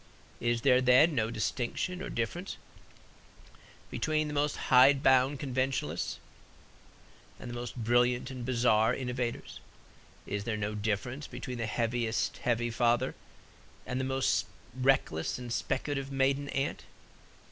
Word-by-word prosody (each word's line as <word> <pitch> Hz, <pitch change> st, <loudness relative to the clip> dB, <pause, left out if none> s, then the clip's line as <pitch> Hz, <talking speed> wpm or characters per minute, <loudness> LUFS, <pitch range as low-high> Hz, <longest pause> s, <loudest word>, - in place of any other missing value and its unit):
Is 120 Hz, 0 st, 0 dB
there, 130 Hz, -1 st, +5 dB
then, 130 Hz, +6 st, +5 dB
no 115 Hz, -5 st, 0 dB
distinction 125 Hz, -, -2 dB
or -, -, -5 dB
difference 170 Hz, -, -3 dB, 1.3 s
between 155 Hz, -1 st, 0 dB
the 150 Hz, -, -5 dB
most 145 Hz, 0 st, +1 dB
hide 135 Hz, +2 st, +5 dB
bound 130 Hz, +1 st, +4 dB
conventionalists 130 Hz, -1 st, -2 dB, 1.2 s
and -, -, -8 dB
the 120 Hz, -, -6 dB
most 120 Hz, 0 st, -6 dB
brilliant 120 Hz, +2 st, +1 dB
and 130 Hz, -2 st, -6 dB
bizarre 120 Hz, -2 st, +3 dB
innovators? 125 Hz, -2 st, -4 dB, 0.7 s
Is 100 Hz, 0 st, -3 dB
there 110 Hz, 0 st, -2 dB
no 105 Hz, 0 st, -2 dB
difference 110 Hz, +7 st, -3 dB
between 125 Hz, 0 st, -6 dB
the 115 Hz, -, -1 dB
heaviest 115 Hz, 0 st, -1 dB
heavy 120 Hz, -1 st, 0 dB
father 120 Hz, +2 st, +2 dB, 0.7 s
and 125 Hz, -, -3 dB
the -, -, -1 dB
most 130 Hz, 0 st, +1 dB, 0.3 s
reckless 130 Hz, -11 st, +1 dB
and 120 Hz, -1 st, -5 dB
speculative 135 Hz, +1 st, -2 dB
maiden 135 Hz, +1 st, +1 dB
aunt? 135 Hz, +1 st, -2 dB
125 Hz, 125 wpm, -30 LUFS, 120-135 Hz, 1.3 s, there